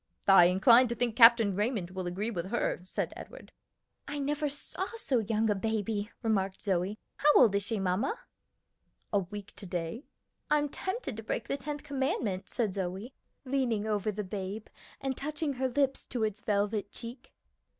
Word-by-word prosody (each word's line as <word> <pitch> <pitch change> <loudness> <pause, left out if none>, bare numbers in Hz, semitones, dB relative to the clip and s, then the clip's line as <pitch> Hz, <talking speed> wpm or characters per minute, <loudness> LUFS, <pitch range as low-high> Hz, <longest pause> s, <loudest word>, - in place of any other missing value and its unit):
"I 195 -3 +8
incline 230 +8 +6
to 235 - -3
think 240 -2 0
Captain 230 -4 +7
Raymond 205 -4 -1
will 185 -1 -4
agree 200 +6 -2
with 180 -4 -3
her," 215 -4 -1
said - - -3
Edward. - - -11 0.6
"I 290 - -4
never 290 +1 -1
saw 290 +6 -4
so 275 - +1
young 220 0 0
a 210 - +3
baby," 210 0 -2
remarked 195 -4 0
Zoe. 190 +1 0 0.2
"How 295 - +5
old 230 -6 +7
is 200 - +2
she, 210 +1 -2
mamma?" 195 - 0 1.0
"A 205 - +4
week 200 +2 -8
to 195 - -7
day." 175 - -4 0.4
"I'm 295 -1 +2
tempted 375 - -4
to - - -5
break 220 - -3
the - - 0
tenth 290 +1 -5
commandment," 265 - -2
said 220 -6 -1
Zoe, 195 +6 -4 0.3
leaning 255 -5 0
over 210 -1 0
the 210 +1 -4
babe 195 +2 -5 0.3
and 270 -1 -2
touching 295 +1 -3
her 260 0 -1
lips 270 +1 0
to 240 -3 -2
its 215 -1 -2
velvet 205 0 0
cheek. 245 +3 -9
220 Hz, 170 wpm, -30 LUFS, 195-265 Hz, 1.0 s, I